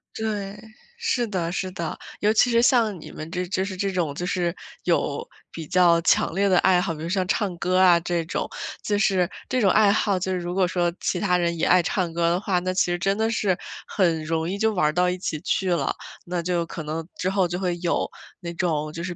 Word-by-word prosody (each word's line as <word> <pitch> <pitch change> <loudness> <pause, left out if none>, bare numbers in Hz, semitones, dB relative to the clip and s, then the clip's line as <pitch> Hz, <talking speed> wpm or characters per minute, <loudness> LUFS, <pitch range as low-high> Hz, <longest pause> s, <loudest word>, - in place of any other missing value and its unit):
对， 210 -2 -3 0.4
是 455 - 0
的 180 -6 -2
是 185 0 -2
的。 170 -3 -4 0.2
尤 210 +1 +3
其 240 +2 +4
是 235 0 +4
像 225 -7 +3
你 - - -10
们 155 +2 -8
这 180 0 -2
就 190 +1 -1
是 190 -1 -5
这 195 +1 0
种 165 -5 -1
就 175 +5 -4
是， 180 -2 0 0.3
有 - - 0 0.3
比 165 - -7
较 175 0 +4
强 165 - +2
烈 200 0 +2
地 185 - +4
爱 180 -1 +4
好， 165 - -2
比 155 - -9
如 165 - -4
像 185 +1 0
唱 195 -5 0
歌 180 +2 0
啊 180 -2 +6
这 170 0 -1
种， 165 - -2 0.4
就 205 -1 0
是 190 -3 +2 0.2
这 255 - 0
种 195 - +4
爱 215 +1 +5
好 200 -2 +2
就 185 +1 -2
是 185 - 0
如 175 0 -4
果 185 -1 +2
说 175 -1 0
其 180 - -1
他 180 -1 +2
人 170 -1 0
也 160 - +1
爱 180 0 +5
唱 175 -1 -1
歌 170 0 +2
的 175 - +2
话， 190 -4 +1
那 185 +1 -2
其 185 - +3
实 175 - -1
真 195 +2 +1
的 220 +1 +1
是， 200 -5 +1 0.3
很 170 -5 +1
容 160 +1 -1
易 195 - -2
就 220 +1 +1
玩 155 -6 +2
儿 - - +2
到 180 +1 +2
一 180 - -2
起 160 -4 -3
去 185 +3 0
了， 170 - 0 0.3
那 175 -1 -3
就 175 -1 0
可 165 -1 -7
能 155 +2 -4
之 185 - -1
后 190 -2 +2
就 175 - -3
会 180 -2 -1
有 175 -1 -1 0.3
那 170 -1 -5
种 155 -4 -1
就 165 - -6
是 180 - -5
180 Hz, 265 characters per minute, -24 LUFS, 170-195 Hz, 0.4 s, 啊